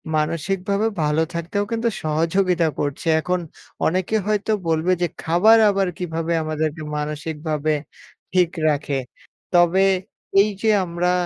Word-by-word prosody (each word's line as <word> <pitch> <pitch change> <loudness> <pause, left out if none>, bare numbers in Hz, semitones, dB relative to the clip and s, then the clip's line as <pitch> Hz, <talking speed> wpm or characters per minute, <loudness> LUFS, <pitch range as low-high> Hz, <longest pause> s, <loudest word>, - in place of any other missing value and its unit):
মানসিকভাবেও 190 +7 0
ভালো 150 +2 +2
থাকতেও 170 +5 -2
কিন্তু 230 0 0
সহযোগিতা 165 +3 +1
করছে। 145 +3 -3
এখন 180 +3 -1 0.5
অনেকে 185 +5 0
হয়তো 210 0 0 0.2
বলবে 160 +3 +1
যে 175 - +2 0.2
খাবার 180 +7 +5
আবার 195 -2 +1
কিভাবে 165 -1 -2
আমাদেরকে 155 0 -2 0.2
মানসিকভাবে 150 0 -2 0.6
ঠিক 180 -2 +4 0.2
রাখে? 145 -2 0 0.6
তবে 175 +2 +5 0.6
এই 210 - +2
যে 225 - +2 0.2
আমরা 175 +1 0
170 Hz, 115 wpm, -22 LUFS, 155-190 Hz, 0.6 s, খাবার